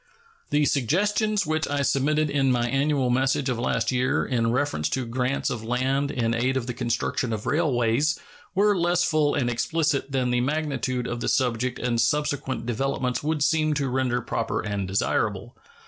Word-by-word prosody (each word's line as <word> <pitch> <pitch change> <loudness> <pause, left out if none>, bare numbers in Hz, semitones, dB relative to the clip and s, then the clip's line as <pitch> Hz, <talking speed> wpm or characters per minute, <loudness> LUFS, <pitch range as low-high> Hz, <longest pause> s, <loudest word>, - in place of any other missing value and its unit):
The 145 0 +2
suggestions 205 - +1
which 155 +1 -1
I 145 0 0
submitted 150 +3 +1
in 135 -2 +2
my 120 -1 +1
annual 135 0 +1
message 135 +2 +1
of 120 -2 -1
last 115 -1 0
year 125 0 +1
in 115 -2 0
reference 125 - 0
to 130 +5 -2
grants 125 +3 -1
of 115 -3 -4
land 130 +4 0
in 115 -4 0
aid 130 +3 +1
of 125 - -2
the 125 - -4
construction 120 +1 -1
of 110 -1 -4
railways 140 -2 +1 0.4
were 205 +1 +4
less 175 0 +2
full 155 -4 +2
and 130 -4 0
explicit 145 +3 0
than 130 -2 0
the 120 0 +2
magnitude 135 -3 -1
of 120 -1 -3
the - - -1
subject 125 -1 0
and 120 -2 0
subsequent 145 0 -1
developments 125 +1 -1
would 150 -1 0
seem 155 -1 +2
to 140 -2 -1
render 125 -1 0
proper 115 -1 -2
and 100 -3 -3
desirable. 95 +2 -1
130 Hz, 175 wpm, -25 LUFS, 120-150 Hz, 0.4 s, were